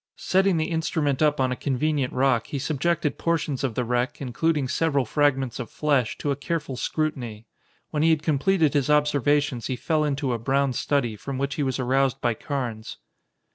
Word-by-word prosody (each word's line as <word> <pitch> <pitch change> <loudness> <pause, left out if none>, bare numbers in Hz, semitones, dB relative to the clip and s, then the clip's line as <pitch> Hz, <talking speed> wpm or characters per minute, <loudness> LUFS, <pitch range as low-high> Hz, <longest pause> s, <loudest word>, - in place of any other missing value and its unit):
Setting 190 -1 +2
the 160 +2 -1
instrument 160 -4 0
up 150 -2 +3
on 130 -1 +2
a - - 0
convenient 140 0 -1
rock, 130 -3 +1
he 145 - -4
subjected 155 +3 -1
portions 160 -5 -1
of 125 -5 -1
the 125 - 0
wreck, 125 +1 -1
including 140 +2 0
several 140 -2 +1
fragments 135 -1 +1
of 120 - -5
flesh, 140 -6 0
to 145 - -2
a - - 0
careful 145 -1 -3
scrutiny. 125 -7 -3 0.5
When 150 - 0
he 165 - +4
had 160 -2 +2
completed 160 +1 +2
his 145 -1 +1
observations 145 -3 +2
he 130 - -2
fell 155 +4 0
into 140 -3 -1
a 115 - -2
brown 135 +3 +1
study, 125 -5 0
from 135 +5 -6
which 140 +1 -1
he 150 - -3
was 130 -2 0
aroused 135 +1 +1
by 120 - +1
Carnes. 120 -3 -5
140 Hz, 185 wpm, -25 LUFS, 130-150 Hz, 0.5 s, he